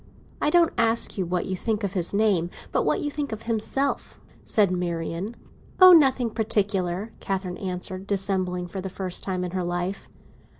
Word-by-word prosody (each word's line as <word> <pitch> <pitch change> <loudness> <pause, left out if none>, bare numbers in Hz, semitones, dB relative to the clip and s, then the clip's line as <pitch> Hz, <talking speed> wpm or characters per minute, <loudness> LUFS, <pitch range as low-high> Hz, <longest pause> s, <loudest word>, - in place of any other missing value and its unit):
"I 295 - +3
don't 335 +1 +4
ask 230 +1 +3
you 185 - -1
what 180 +1 -1
you 190 - -2
think 215 +3 -2
of 195 -2 -2
his 180 -4 0
name, 200 -5 +2 0.2
but - - +2
what - - +1
you 290 - -2
think 290 -3 -4
of 220 0 -6
himself," 235 +5 -1 0.2
said 205 -4 +2
Marian. 175 +3 -3 0.4
"Oh, 370 -1 +10
nothing 265 -7 +4
particular!" 200 -2 -1
Catherine 190 -2 -3
answered, 185 0 -5
dissembling 190 -3 0
for 185 +2 -6
the 190 - -5
first 185 -1 -3
time 185 -2 -2
in 180 - -4
her 185 0 -2
life. 175 +2 -3
195 Hz, 175 wpm, -25 LUFS, 180-220 Hz, 0.4 s, Oh